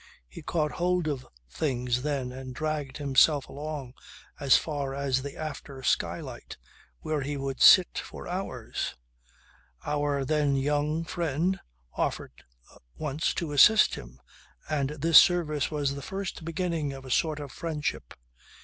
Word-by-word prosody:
He -, -, -11 dB
caught 155 Hz, -3 st, -1 dB
hold 180 Hz, -1 st, 0 dB
of 135 Hz, -4 st, -3 dB, 0.2 s
things 125 Hz, -, -1 dB
then 135 Hz, -3 st, -2 dB
and 130 Hz, 0 st, -8 dB
dragged 150 Hz, -3 st, -3 dB
himself 145 Hz, 0 st, +3 dB
along 145 Hz, -3 st, -6 dB, 0.5 s
as 140 Hz, -2 st, +5 dB
far 140 Hz, -3 st, -3 dB
as 135 Hz, -2 st, 0 dB
the 140 Hz, +1 st, -7 dB
after 140 Hz, -3 st, -7 dB
skylight -, -, -2 dB, 0.4 s
where 155 Hz, -2 st, -1 dB
he 145 Hz, +1 st, -3 dB
would 135 Hz, -1 st, -4 dB
sit 185 Hz, -3 st, +7 dB
for -, -, -8 dB
hours. 175 Hz, -11 st, -4 dB, 0.9 s
Our, 145 Hz, -2 st, 0 dB
then 145 Hz, -1 st, +2 dB
young, 145 Hz, +3 st, 0 dB
friend 170 Hz, +2 st, -1 dB, 0.3 s
offered -, -, -3 dB, 0.5 s
once 150 Hz, +1 st, -1 dB
to 165 Hz, -4 st, -3 dB
assist 215 Hz, +10 st, +6 dB
him 60 Hz, +2 st, -9 dB, 0.5 s
and 145 Hz, -3 st, 0 dB
this 155 Hz, +2 st, +7 dB
service 155 Hz, -6 st, +1 dB
was 145 Hz, -3 st, -1 dB
the 140 Hz, -, -6 dB
first 190 Hz, +2 st, -5 dB
beginning 165 Hz, -3 st, -2 dB
of 135 Hz, -1 st, -10 dB
a 130 Hz, -, -7 dB
sort 155 Hz, +2 st, +1 dB
of 145 Hz, -3 st, -7 dB
friendship. 150 Hz, -, -4 dB
145 Hz, 140 wpm, -28 LUFS, 135-155 Hz, 0.9 s, sit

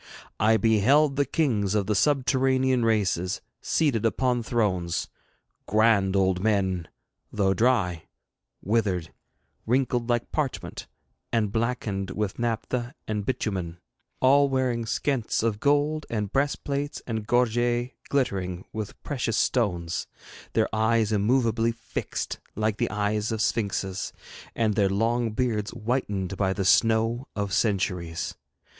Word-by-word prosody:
I 110 Hz, +1 st, +4 dB
beheld 120 Hz, +8 st, +4 dB
the 140 Hz, 0 st, +2 dB
kings 110 Hz, -, +1 dB
of 100 Hz, -2 st, +1 dB
the 105 Hz, -, 0 dB
subterranean 130 Hz, 0 st, +2 dB
races 100 Hz, -5 st, +1 dB, 0.2 s
seated 140 Hz, -9 st, +1 dB
upon 120 Hz, +2 st, +1 dB
thrones 95 Hz, -7 st, 0 dB, 0.6 s
grand 105 Hz, -3 st, +3 dB
old 95 Hz, -1 st, +2 dB
men, 95 Hz, -6 st, +1 dB, 0.4 s
though 95 Hz, -2 st, +2 dB
dry, 100 Hz, -7 st, +1 dB, 0.6 s
withered, 100 Hz, -6 st, 0 dB, 0.5 s
wrinkled 125 Hz, -1 st, +1 dB
like 120 Hz, -1 st, 0 dB
parchment, 145 Hz, -4 st, -3 dB, 0.4 s
and 110 Hz, -4 st, +1 dB
blackened 110 Hz, -4 st, -1 dB
with 105 Hz, +2 st, -3 dB
naphtha 120 Hz, +2 st, -2 dB
and 105 Hz, -2 st, -3 dB
bitumen 95 Hz, -9 st, -2 dB, 0.4 s
all 140 Hz, +2 st, +5 dB
wearing 130 Hz, -3 st, 0 dB
pshents 120 Hz, -1 st, -1 dB
of 110 Hz, -2 st, 0 dB
gold, 145 Hz, +3 st, +1 dB
and 105 Hz, -3 st, -3 dB
breastplates 140 Hz, +1 st, -1 dB
and 110 Hz, -3 st, -4 dB
gorgets 120 Hz, +1 st, +1 dB, 0.2 s
glittering 95 Hz, -9 st, -1 dB
with 110 Hz, -2 st, -5 dB
precious 125 Hz, -6 st, -1 dB
stones, 90 Hz, -8 st, 0 dB, 0.5 s
their -, -, +3 dB
eyes 110 Hz, 0 st, +2 dB
immovably 115 Hz, +1 st, +2 dB
fixed 115 Hz, 0 st, -5 dB, 0.2 s
like 110 Hz, 0 st, 0 dB
the -, -, 0 dB
eyes 105 Hz, +1 st, -1 dB
of 110 Hz, -, -2 dB
sphinxes, 100 Hz, -3 st, -1 dB, 0.4 s
and 110 Hz, -2 st, +1 dB
their 100 Hz, -2 st, +2 dB
long 115 Hz, +4 st, +1 dB
beards 110 Hz, -2 st, -1 dB
whitened 105 Hz, -5 st, -2 dB
by 95 Hz, -1 st, +1 dB
the 95 Hz, 0 st, -2 dB
snow 115 Hz, +5 st, +3 dB
of 100 Hz, -3 st, -2 dB
centuries. 90 Hz, -6 st, -1 dB
110 Hz, 120 wpm, -26 LUFS, 100-125 Hz, 0.6 s, all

